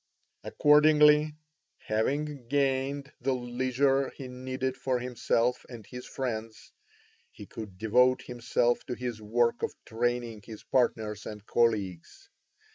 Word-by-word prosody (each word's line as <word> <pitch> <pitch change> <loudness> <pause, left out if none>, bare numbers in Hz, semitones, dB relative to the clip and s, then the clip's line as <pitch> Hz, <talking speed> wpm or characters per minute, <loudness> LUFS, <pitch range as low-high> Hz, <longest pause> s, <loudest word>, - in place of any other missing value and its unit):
Accordingly, 150 0 +5 0.4
having 135 +4 -2
gained 140 +1 0
the 135 +2 +1
leisure 130 +2 +1
he 135 - -9
needed 130 +1 -4
for 130 -1 -1
himself 125 0 0
and 115 -4 -10
his 125 +3 -9
friends, 115 -4 -5 0.6
he - - -12
could 105 -5 -9
devote 125 +5 +3
himself 120 0 0
to 125 - -3
his 120 -3 -5
work 115 +2 +1
of - - -2
training 120 -1 -2
his 110 -1 -10
partners 110 -4 0
and 105 -1 -8
colleagues. 110 - -1
125 Hz, 120 wpm, -29 LUFS, 115-135 Hz, 0.6 s, Accordingly